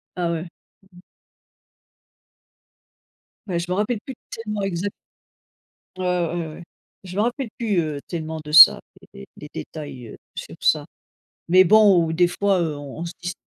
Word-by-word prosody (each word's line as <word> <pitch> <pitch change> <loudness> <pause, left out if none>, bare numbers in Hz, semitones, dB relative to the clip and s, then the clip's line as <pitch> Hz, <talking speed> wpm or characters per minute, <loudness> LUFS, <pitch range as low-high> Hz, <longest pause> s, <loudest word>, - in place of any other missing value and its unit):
Ah 175 -2 -1
ouais. 165 +1 -4 0.5
Mmh. 180 - -15 2.5
Bah, 180 -3 -2
je 170 - -2
m'en 180 - 0
rappelle 215 +2 0
plus 265 - -7
tellement, 210 -2 -5
exa 195 0 -2 1.1
Ouais, 185 - -3
ouais, 175 -2 -1
ouais. 155 +2 -10 0.4
Je 185 -1 -9
me 205 - +1
rappelle 245 +2 -2
plus, 220 -7 0
heu, 155 -3 -2
tellement 160 -2 -5
de 150 - -8
ça, 155 - +10 0.2
d - - -18
des 65 - -11
des - - -10
détails, 130 - -8
heu, - - -11 0.2
sur - - -8
ça - - +2 0.6
mais 185 +2 +6
bon, 200 -3 +6
où, 160 - -3
des 175 +2 +3
fois, 195 0 +1
heu, 160 -3 -2
on 145 0 -9
on 170 - -4
se 170 - -5
dis 175 +1 -4
175 Hz, 170 wpm, -22 LUFS, 160-200 Hz, 2.5 s, ça